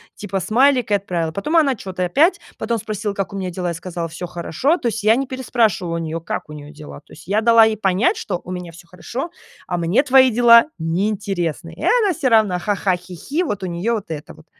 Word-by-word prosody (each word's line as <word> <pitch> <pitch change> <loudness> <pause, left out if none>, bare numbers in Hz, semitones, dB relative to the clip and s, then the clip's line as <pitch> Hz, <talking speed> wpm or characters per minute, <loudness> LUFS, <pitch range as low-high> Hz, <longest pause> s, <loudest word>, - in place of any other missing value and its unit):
типа 195 -2 -4
смайлик 250 +1 +2
и 205 - +5
отправила. 175 -5 -2
Потом 200 - -3
она 285 -5 +4
чё-то 185 -3 -5
опять, 300 - +3 0.2
потом 230 +1 -1
спросила, 210 -1 -4
как 195 0 -3
у - - -4
меня 185 -1 -3
дела, 180 0 -4
я 170 - -2
сказала: 170 -1 -5
"Всё 175 +2 -6
хорошо". 175 - 0
То 240 - -1
есть 225 0 -4
я 220 +2 +5
не 270 0 -2
переспрашивала 225 -9 0
у - - -1
неё, 165 0 -4
как 165 - -5
у - - -8
неё 145 0 -10
дела. 150 -2 -11
То - - -20
есть 165 - -14
я 205 +2 +2
дала 230 0 +6
ей 220 -1 0
понять, 200 - +1
что 180 -5 -4
у 180 - -8
меня 180 -2 -6
всё 175 - -14
хорошо, 235 - -6 0.4
а 175 - -2
мне 170 - +2
твои 260 -1 +5
дела 235 +1 +6
неинтересны. 175 -1 -2
И - - -10
она 435 -6 +3
всё 295 -5 -1
равно 215 -6 +3
ха-ха-хи-хи, 190 - -2
вот 205 - -4
у 185 - -2
неё 175 +7 -2
вот 205 -5 -6
это 150 -1 -7
вот. - - -18
200 Hz, 230 wpm, -20 LUFS, 175-235 Hz, 0.4 s, дала